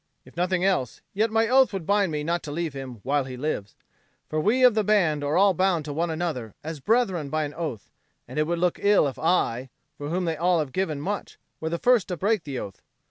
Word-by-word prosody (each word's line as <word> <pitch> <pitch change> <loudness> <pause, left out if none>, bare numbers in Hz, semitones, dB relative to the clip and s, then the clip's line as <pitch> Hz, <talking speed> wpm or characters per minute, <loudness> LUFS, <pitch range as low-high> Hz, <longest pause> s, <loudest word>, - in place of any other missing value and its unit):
"If - - -17
nothing 180 +1 +1
else, 180 - 0
yet 215 +3 +1
my 225 +1 +2
oath 260 +2 +5
would 190 -5 -4
bind 200 -2 +2
me 150 -1 -2
not 170 +2 -1
to 145 - -5
leave 165 -1 -3
him 130 -5 -8
while 140 +1 +1
he 130 -1 -7
lives. 125 -8 -3 0.5
For 155 - -1
we 235 +9 +2
of 250 -2 +7
the 215 0 +1
band 175 -8 +2
are 145 +3 +1
all 195 0 +5
bound 180 -3 +1
to 145 - -4
one 165 +3 -1
another 155 -9 -3
as 160 0 -5
brethren 190 - +1
by 155 +2 0
an 145 -1 -5
oath, 150 - -5 0.4
and - - -4
it 155 - +1
would 170 +1 0
look 175 0 0
ill 200 -6 +4
if 135 - -6
I, 135 -7 +1 0.3
for 145 0 -4
whom 180 +2 -1
they 165 -2 -1
all 175 +2 +2
have 150 -4 -1
given 170 -5 -1
much, 200 +7 -4 0.2
were 160 - -3
the 170 - -1
first 245 +1 +3
to 180 -3 -3
break 205 -1 0
the 140 -3 -4
oath. 100 -5 -7
165 Hz, 245 wpm, -25 LUFS, 145-195 Hz, 0.5 s, of